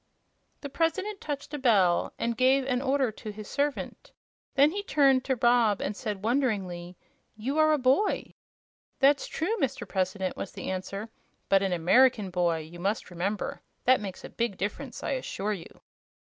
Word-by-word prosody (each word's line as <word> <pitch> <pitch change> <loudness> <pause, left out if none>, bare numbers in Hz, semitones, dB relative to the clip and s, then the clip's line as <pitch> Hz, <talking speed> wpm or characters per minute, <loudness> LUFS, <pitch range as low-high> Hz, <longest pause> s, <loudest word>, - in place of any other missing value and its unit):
The 285 - -6
President 380 +7 -1
touched 290 0 -5
a 295 - -3
bell 200 -9 +3
and 235 0 -1
gave 260 +2 +3
an 250 -2 0
order 270 -3 +1
to 215 - -9
his 210 0 -8
servant. 290 - -3 0.4
Then 285 +3 +5
he 405 +3 -3
turned 275 -8 +3
to 265 - +1
Rob 235 -3 +3
and 205 - -3
said, 210 -4 -5
wonderingly: 195 -8 -1 0.4
"You 270 +8 -2
are 310 0 +5
a 305 - +4
boy!" 270 +11 +1 0.6
"That's 280 +1 +4
true, 355 +8 -1
Mr. 270 0 -1
President," 185 -1 -1
was 195 - -6
the - - -5
answer; 195 +3 -5 0.4
"but 195 -1 +5
an 195 -1 0
American 200 +4 +4
boy, 175 -2 +1
you 165 +3 -11
must 195 +1 -2
remember. 190 +4 -3 0.2
That 255 -1 +4
makes 195 -3 -7
a - - -7
big 230 -5 -2
difference, 230 +6 -4
I - - -2
assure 215 -6 -2
you." 175 -5 -10
235 Hz, 170 wpm, -28 LUFS, 195-275 Hz, 0.6 s, Then